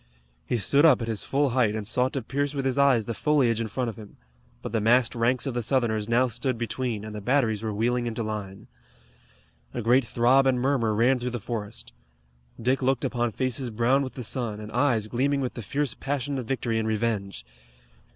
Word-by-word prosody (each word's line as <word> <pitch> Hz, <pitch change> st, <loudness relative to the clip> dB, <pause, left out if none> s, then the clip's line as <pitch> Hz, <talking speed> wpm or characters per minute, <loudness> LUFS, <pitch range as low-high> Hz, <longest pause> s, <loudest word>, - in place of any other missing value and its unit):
He 120 Hz, -, 0 dB
stood 140 Hz, +8 st, +3 dB
up 155 Hz, -7 st, +6 dB
at -, -, -4 dB
his 110 Hz, -3 st, -2 dB
full 140 Hz, -1 st, +1 dB
height 115 Hz, -4 st, +2 dB
and 110 Hz, -1 st, -4 dB
sought 125 Hz, +2 st, +1 dB
to 135 Hz, -, -2 dB
pierce 145 Hz, +4 st, -2 dB
with 135 Hz, -1 st, -2 dB
his 135 Hz, +1 st, 0 dB
eyes 135 Hz, -6 st, +4 dB
the 115 Hz, -, -3 dB
foliage 125 Hz, -4 st, +2 dB
in 115 Hz, -, -2 dB
front 125 Hz, +4 st, -2 dB
of 110 Hz, -, -5 dB
him, 105 Hz, -2 st, -12 dB, 0.5 s
but -, -, -5 dB
the 110 Hz, -1 st, 0 dB
massed 120 Hz, +2 st, +3 dB
ranks 120 Hz, +3 st, +1 dB
of 135 Hz, -, -2 dB
the 120 Hz, -, -1 dB
Southerners 115 Hz, -3 st, 0 dB
now 125 Hz, +2 st, +3 dB
stood 120 Hz, +1 st, -2 dB
between, 115 Hz, -1 st, -3 dB
and 110 Hz, -, -7 dB
the 105 Hz, -, -6 dB
batteries 115 Hz, -3 st, +1 dB
were 110 Hz, -1 st, -3 dB
wheeling 120 Hz, +3 st, 0 dB
into 115 Hz, 0 st, -3 dB
line. 105 Hz, -3 st, -6 dB, 1.1 s
A 120 Hz, -, -2 dB
great 125 Hz, +4 st, +4 dB
throb 125 Hz, +4 st, +3 dB
and 130 Hz, -2 st, +2 dB
murmur 125 Hz, -5 st, +1 dB
ran 125 Hz, +4 st, +3 dB
through 125 Hz, +1 st, -2 dB
the 120 Hz, 0 st, -4 dB
forest. 105 Hz, -1 st, -5 dB, 0.7 s
Dick 130 Hz, +4 st, +1 dB
looked 135 Hz, +1 st, +1 dB
upon 120 Hz, -2 st, -1 dB
faces 130 Hz, +2 st, -1 dB
brown 120 Hz, +5 st, +2 dB
with 130 Hz, -2 st, -5 dB
the 125 Hz, -, -5 dB
sun, 115 Hz, -3 st, -1 dB
and 105 Hz, 0 st, -8 dB
eyes 120 Hz, -5 st, +1 dB
gleaming 135 Hz, +5 st, 0 dB
with 130 Hz, -2 st, -2 dB
the 120 Hz, -, -6 dB
fierce 140 Hz, +3 st, -1 dB
passion 140 Hz, +1 st, -3 dB
of 125 Hz, -, -5 dB
victory 120 Hz, -3 st, -1 dB
and 110 Hz, -, -2 dB
revenge. 105 Hz, -, -2 dB
120 Hz, 215 wpm, -26 LUFS, 110-130 Hz, 1.1 s, up